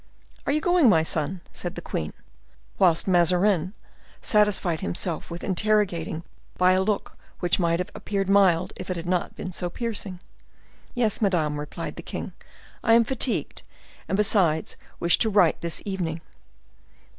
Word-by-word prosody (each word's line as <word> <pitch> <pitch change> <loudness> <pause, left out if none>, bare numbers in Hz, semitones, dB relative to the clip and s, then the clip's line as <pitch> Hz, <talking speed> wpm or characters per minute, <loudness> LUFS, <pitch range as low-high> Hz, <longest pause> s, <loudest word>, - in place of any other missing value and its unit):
"Are - - +2
you 305 +2 +1
going, 350 -6 +4
my 160 -6 +4
son?" 165 +3 -2
said 175 +1 -5
the - - -5
queen, 75 - -3 0.7
whilst 170 -2 +3
Mazarin 180 +1 +3 0.4
satisfied 205 -6 +2
himself 155 - -3
with 170 0 -7
interrogating 185 -5 0 0.3
by 180 0 +4
a 185 - +2
look 205 +1 -2 0.2
which 175 0 +1
might 170 -1 +2
have 180 - -4
appeared 195 -2 -3
mild 185 -3 +3
if 185 - -8
it 185 - -1
had 170 - -6
not 180 0 -1
been 185 - -6
so 175 0 -3
piercing. 205 -3 -4 0.8
"Yes, 230 -4 0
madame," 160 -7 +1
replied 150 - -6
the - - -5
king; - - -6 0.5
"I 225 - +4
am 230 0 +6
fatigued, 255 +1 -2 0.5
and, - - -1
besides, 185 -7 +2 0.2
wish 170 - +4
to 225 - +3
write 195 -6 +3
this 170 -1 -3
evening." 175 -5 -3
185 Hz, 155 wpm, -25 LUFS, 170-210 Hz, 0.8 s, am